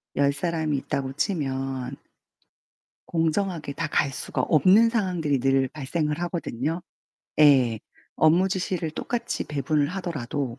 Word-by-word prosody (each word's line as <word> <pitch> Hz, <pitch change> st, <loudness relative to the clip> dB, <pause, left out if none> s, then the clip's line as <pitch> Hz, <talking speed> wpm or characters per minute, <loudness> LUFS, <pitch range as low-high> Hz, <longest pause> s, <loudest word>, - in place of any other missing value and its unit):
10 140 Hz, 0 st, +3 dB
사람이 155 Hz, 0 st, -1 dB
있다고 135 Hz, 0 st, -3 dB
치면 135 Hz, -, -2 dB, 1.2 s
공정하게 165 Hz, -2 st, 0 dB
다 165 Hz, +3 st, -2 dB
갈 145 Hz, -1 st, +1 dB
수가 130 Hz, -, -3 dB
없는 185 Hz, -, +5 dB
상황들이 180 Hz, -, 0 dB
늘 135 Hz, +1 st, +2 dB
발생을 150 Hz, +2 st, -2 dB
하거든요. 165 Hz, -2 st, -2 dB, 0.6 s
예. 130 Hz, -7 st, +5 dB, 0.4 s
업무 170 Hz, +5 st, +4 dB
지시를 180 Hz, -3 st, -2 dB
똑같이 240 Hz, +8 st, -3 dB
배분을 145 Hz, 0 st, 0 dB
하더라도. 145 Hz, -8 st, -4 dB
150 Hz, 260 characters per minute, -25 LUFS, 135-175 Hz, 1.2 s, 없는